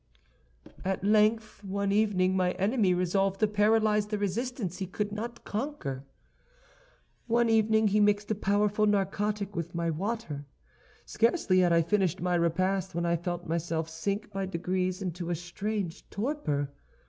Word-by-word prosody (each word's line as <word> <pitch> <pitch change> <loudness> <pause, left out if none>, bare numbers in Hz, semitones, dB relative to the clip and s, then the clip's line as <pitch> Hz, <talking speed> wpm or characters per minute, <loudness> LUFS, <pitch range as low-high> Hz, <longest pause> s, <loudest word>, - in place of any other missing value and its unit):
"At 190 0 -2
length, 215 +1 +2
one 200 0 -1
evening 200 -3 +2
my 180 -1 +2
enemy 200 +1 +2
resolved 190 +2 +1
to 215 - +4
paralyze 210 0 +3
the 210 0 -2
resistance 205 -1 -2
he 190 - -3
could 205 +3 -3
not 230 +3 -6
conquer. 205 - -4 1.2
One 235 0 +3
evening 220 -1 +3
he 210 +2 +2
mixed 205 0 +2
a - - +4
powerful 210 +1 +1
narcotic 205 0 0
with 170 +1 -4
my 170 -1 0
water. 165 -5 -4 0.6
Scarcely 225 - +2
had 180 -1 +4
I 170 0 +4
finished 190 0 +1
my 180 +1 0
repast, 185 +2 0
when 170 0 0
I 170 0 +2
felt 175 +1 -4
myself 165 0 -2
sink 200 +7 -3
by 195 -1 -3
degrees 185 +2 -2
into 175 -1 -4
a 175 - 0
strange 185 +2 -4
torpor. 200 - -2
195 Hz, 150 wpm, -29 LUFS, 175-210 Hz, 1.2 s, to